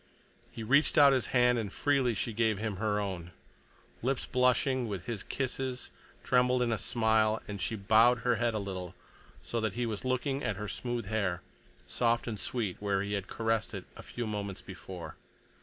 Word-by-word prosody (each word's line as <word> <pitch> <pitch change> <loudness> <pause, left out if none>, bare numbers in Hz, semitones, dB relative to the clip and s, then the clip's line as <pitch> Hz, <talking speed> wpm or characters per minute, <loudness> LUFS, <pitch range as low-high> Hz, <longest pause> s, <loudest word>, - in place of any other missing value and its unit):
He 115 - -7
reached 140 +7 +3
out 140 -1 +8
his 130 -5 +1
hand, 125 -1 +3
and 105 -3 -3
freely 135 -3 +1
she 115 +3 -2
gave 110 -1 +1
him 105 -1 -3
her 105 0 0
own. 95 -4 -4 0.7
Lips 130 +2 0
blushing 125 0 +2
with 100 -4 -5
his 115 -5 -3
kisses 130 -1 -3 0.3
trembled 125 0 +3
in 120 - 0
a 110 - 0
smile, 110 0 +2
and 100 -2 -5
she 110 - -1
bowed 110 +4 +4
her 120 0 +2
head 120 0 +1
a - - +1
little, 95 -3 -5 0.5
so 115 - -2
that 110 -3 -1
he 120 - 0
was 110 -3 -3
looking 135 +2 -1
at 105 - -1
her 105 +2 -5
smooth 120 0 -3
hair, 100 -4 -1 0.4
soft 120 0 +1
and 110 -4 -4
sweet 110 -6 -2
where 100 -1 0
he 100 0 -3
had 100 -2 -2
caressed 115 -1 -1
it - - -6
a - - -8
few 120 - -5
moments 100 -3 -4
before. 95 -1 -9
110 Hz, 190 wpm, -31 LUFS, 100-125 Hz, 0.7 s, out